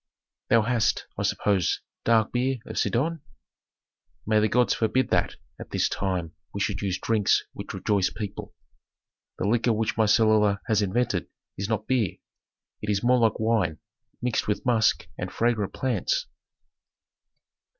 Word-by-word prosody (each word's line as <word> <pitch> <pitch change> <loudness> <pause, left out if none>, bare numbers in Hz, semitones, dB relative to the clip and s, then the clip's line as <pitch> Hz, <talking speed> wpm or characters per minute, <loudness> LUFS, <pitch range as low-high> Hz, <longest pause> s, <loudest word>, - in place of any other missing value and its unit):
"Thou 115 -1 +5
hast, 115 -1 +1
I - - -4
suppose, 95 -5 +1 0.3
dark 110 -2 +3
beer 130 +2 0
of - - -4
Sidon?" 160 +6 0 1.0
"May 110 0 +3
the 105 - +3
gods 120 +3 +3
forbid 115 +3 +1
that - - +1 0.2
at - - -9
this - - +1
time 90 -4 -2 0.2
we - - -2
should 100 0 -1
use 95 -2 -1
drinks 110 -2 +2
which - - -7
rejoice 100 -3 +1
people. 105 -2 -7 0.8
The 95 - -1
liquor 115 +2 +2
which 110 0 -1
my 110 -1 +3
cellarer 105 -1 +4
has 110 -3 +2
invented 105 -1 0 0.3
is 100 +2 -4
not 110 -1 -1
beer; 115 -9 +1 0.7
it 105 - -4
is 100 0 0
more 125 +1 +4
like 115 -2 +2
wine 110 -8 +1 0.5
mixed 125 -2 0
with 105 - -1
musk 115 -4 +2
and - - -4
fragrant 115 -4 0
plants." - - 0
110 Hz, 150 wpm, -26 LUFS, 100-120 Hz, 1.0 s, Thou